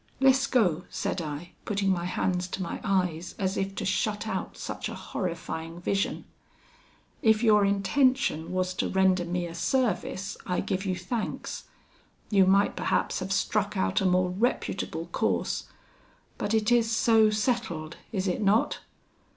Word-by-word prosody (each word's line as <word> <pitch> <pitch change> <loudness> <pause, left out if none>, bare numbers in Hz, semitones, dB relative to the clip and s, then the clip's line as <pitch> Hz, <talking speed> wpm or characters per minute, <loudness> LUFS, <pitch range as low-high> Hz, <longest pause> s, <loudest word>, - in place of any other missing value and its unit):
'Lescaut,' 255 - +3
said 185 - -2
I, 155 +2 -6
putting 200 -2 0
my 175 -2 0
hands 180 0 -1
to 185 +1 -4
my 170 - -5
eyes 180 -4 0
as 190 0 -1
if 195 0 -2
to - - -3
shut 210 +2 0
out 190 -3 -4
such - - -4
a - - -6
horrifying 165 -2 -5
vision, 195 +3 -1 1.0
'if 220 0 +4
your 210 -2 +5
intention 200 - +2
was 185 0 0
to - - -1
render 190 -2 +3
me 175 0 -2
a 170 - -7
service, 205 -1 -1
I 180 - -1
give 190 +1 -2
you 185 - 0
thanks. 200 +6 -4 0.7
You 195 -2 +5
might 195 +1 +4
perhaps - - 0
have 185 +1 -4
struck 200 +1 0
out 190 +2 +1
a - - 0
more 180 0 +2
reputable 225 +7 -1
course, - - 0 0.7
but 215 - 0
it 220 +1 +2
is 235 -2 +4
so 225 -1 +4
settled, 210 -8 -1
is 195 -2 -1
it 180 - -1
not? 210 +2 +2
195 Hz, 150 wpm, -28 LUFS, 180-215 Hz, 1.0 s, your